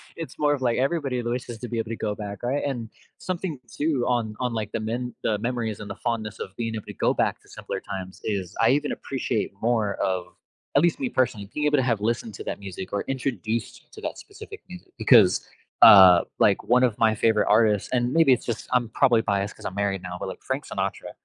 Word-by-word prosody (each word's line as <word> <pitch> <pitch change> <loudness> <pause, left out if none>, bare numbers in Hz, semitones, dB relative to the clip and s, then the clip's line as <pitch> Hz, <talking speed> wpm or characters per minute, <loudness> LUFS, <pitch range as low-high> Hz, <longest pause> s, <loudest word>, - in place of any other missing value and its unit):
It's 165 -1 -7
more 150 -1 +3
of, 140 - -3
like, 120 -2 +1
everybody 135 -2 0
always 120 +1 -2
has 120 - -7
to 125 - -6
be 120 - -4
able 110 -1 -3
to 115 - -3
go 105 -1 -2
back, 100 -2 -7
right? 130 +4 -1
And, 120 -5 -3 0.3
something 175 -5 -4
too 145 -5 0
on 115 -3 0
on, 125 -2 -1
like, 110 -2 -3
the - - -1
men 120 +3 -3
the 105 - +1
memories 115 -2 -2
and 105 - -8
the 100 - -5
fondness 110 -3 -3
of 95 - -7
being 115 0 -3
able 110 - -6
to - - -8
go - - +1
back - - 0
to - - -24
simpler - - -6
times 95 -1 -7
is, 100 -3 -3
I 115 - +5
even 145 +2 +1
appreciate 125 -4 -2
more 110 -3 +1
of- 90 -2 -1 0.5
at 140 - +6
least, 170 0 +2
me, 265 -3 -1
personally- 110 - -1
being 150 - -1
able 150 0 +3
to 130 - +2
have 115 -4 +1
listened 115 0 -1
to - - -7
that - - -4
music 95 -1 -8
or 100 - -1
introduced 120 -4 -3
to - - -11
that - - -4
specific 420 +1 -11
music 180 -1 -12
because, 105 -8 +5 0.4
uh, 95 -3 +10 0.2
like, - - +3
one 125 +1 +3
of 120 -4 +1
my 110 -1 +3
favorite 110 0 +2
artists 105 -3 +3
and, 125 0 +1
maybe 160 -4 +5
it's 125 - -2
just 115 -2 -4
I'm 125 -2 +2
probably 120 0 +3
biased 100 -1 -1
'cause - - -13
I'm 95 - -4
married 100 -2 -1
now, 90 -1 -6
but, - - -4
like, - - -9
Frank - - -3
Sinatra - - -4
115 Hz, 235 wpm, -25 LUFS, 105-130 Hz, 0.5 s, uh